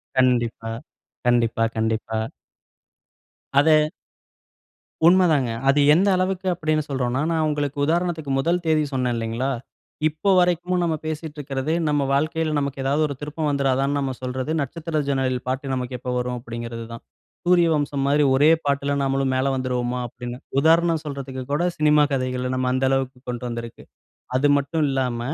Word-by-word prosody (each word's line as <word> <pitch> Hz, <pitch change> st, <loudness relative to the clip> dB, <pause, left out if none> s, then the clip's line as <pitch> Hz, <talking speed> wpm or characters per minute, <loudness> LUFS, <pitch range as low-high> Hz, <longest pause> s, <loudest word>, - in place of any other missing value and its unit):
கண்டிப்பா, 120 Hz, -3 st, +1 dB, 0.5 s
கண்டிப்பா, 115 Hz, -2 st, +2 dB
கண்டிப்பா. 110 Hz, 0 st, -1 dB, 1.3 s
அத 155 Hz, +2 st, +4 dB, 1.2 s
உண்ம 185 Hz, +2 st, +6 dB
தாங்க. 135 Hz, -5 st, +2 dB, 0.2 s
அது 145 Hz, +1 st, +4 dB
எந்த 190 Hz, +5 st, +3 dB
அளவுக்கு 185 Hz, 0 st, -1 dB
அப்படீன்னு 155 Hz, -2 st, 0 dB
சொல்றோன்னா, 130 Hz, 0 st, -1 dB
நான் 160 Hz, -1 st, +1 dB
உங்களுக்கு 145 Hz, -1 st, -2 dB
உதாரணத்துக்கு 165 Hz, -3 st, -1 dB
முதல் 170 Hz, +5 st, +1 dB
தேதி 155 Hz, -1 st, +3 dB
சொன்னேன் 125 Hz, -2 st, 0 dB
இல்லைங்களா? 115 Hz, +4 st, -2 dB, 0.6 s
இப்ப 155 Hz, +6 st, 0 dB
வரைக்கும் 180 Hz, 0 st, +1 dB
நம்ம 165 Hz, -2 st, +1 dB
பேசிட்டுருக்கதே 150 Hz, -2 st, -3 dB
நம்ம 145 Hz, -1 st, +2 dB
வாழ்க்கையில 155 Hz, +2 st, 0 dB
நமக்கு 140 Hz, -1 st, -3 dB
ஏதாவது 145 Hz, +3 st, +1 dB
ஒரு 140 Hz, -, -4 dB
திருப்பம் 150 Hz, +1 st, -3 dB
வந்துருதான்னு 140 Hz, 0 st, +1 dB
நம்ம 135 Hz, -1 st, -1 dB
சொல்றது, 130 Hz, +3 st, -3 dB
"நட்சத்திர 155 Hz, +3 st, -3 dB
ஜன்னலில் 130 Hz, -2 st, -1 dB
பாட்டு 135 Hz, +1 st, -2 dB
நமக்கு 125 Hz, 0 st, -3 dB
எப்ப 125 Hz, -, -6 dB
வரும்?" 125 Hz, 0 st, -2 dB
அப்படீங்கிறது 115 Hz, -1 st, -6 dB
தான். 115 Hz, -, -9 dB, 0.4 s
சூரியவம்சம் 160 Hz, -6 st, +2 dB
மாரி 145 Hz, +1 st, +3 dB
ஒரே 145 Hz, +4 st, +5 dB, 0.2 s
பாட்டுல 140 Hz, 0 st, 0 dB
நாமளும் 135 Hz, -1 st, 0 dB
மேல 135 Hz, +1 st, +1 dB
வந்துருவோமா? 125 Hz, -1 st, -2 dB
அப்படின்னு. 120 Hz, +1 st, -7 dB, 0.2 s
உதாரணம் 165 Hz, +1 st, +3 dB
சொல்றதுக்கு 135 Hz, -2 st, -5 dB
கூட 150 Hz, +4 st, +1 dB
சினிமா 150 Hz, -1 st, +4 dB
கதைகள 130 Hz, -1 st, -1 dB
நம்ம 130 Hz, 0 st, -1 dB
அந்த 130 Hz, +1 st, +1 dB
அளவுக்கு 135 Hz, -1 st, -1 dB
கொண்டு 120 Hz, 0 st, -4 dB
வந்துருக்கு. 115 Hz, -1 st, -6 dB, 0.5 s
அது 140 Hz, +3 st, +3 dB
மட்டும் 150 Hz, +3 st, -1 dB
இல்லாம, 130 Hz, -3 st, -1 dB
140 Hz, 140 wpm, -23 LUFS, 125-155 Hz, 1.3 s, உண்ம